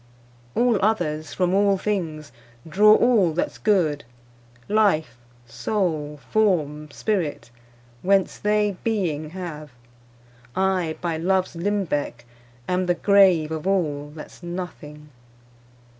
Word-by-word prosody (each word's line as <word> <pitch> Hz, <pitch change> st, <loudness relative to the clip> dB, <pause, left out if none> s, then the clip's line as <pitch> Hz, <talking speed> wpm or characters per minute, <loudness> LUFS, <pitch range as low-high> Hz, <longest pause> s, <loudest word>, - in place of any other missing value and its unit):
All 240 Hz, -5 st, +2 dB
others, 155 Hz, -8 st, 0 dB
from 180 Hz, -1 st, 0 dB
all 200 Hz, 0 st, +3 dB
things, 160 Hz, -8 st, -3 dB, 0.4 s
draw 210 Hz, +6 st, +6 dB
all 220 Hz, -10 st, +3 dB
that's 175 Hz, -, -2 dB
good, 170 Hz, -9 st, +1 dB, 0.6 s
Life, 195 Hz, -, +2 dB, 0.3 s
soule, 150 Hz, -, -2 dB
forme, 150 Hz, -8 st, +1 dB
spirit, 165 Hz, -, -2 dB, 0.5 s
whence 195 Hz, 0 st, +1 dB
they 210 Hz, -2 st, +1 dB
beeing 170 Hz, -9 st, -1 dB
have; 155 Hz, -5 st, -7 dB, 0.8 s
I, 185 Hz, -4 st, 0 dB
by 170 Hz, -2 st, -2 dB
loves 185 Hz, +2 st, 0 dB
limbecke, 170 Hz, -, -2 dB, 0.4 s
am 180 Hz, 0 st, 0 dB
the 175 Hz, -, +2 dB
grave 185 Hz, -5 st, +4 dB
Of 160 Hz, +2 st, -4 dB
all, 150 Hz, -7 st, -1 dB
that's 155 Hz, -, -11 dB
nothing. 170 Hz, -4 st, -7 dB
180 Hz, 105 wpm, -23 LUFS, 155-200 Hz, 0.8 s, draw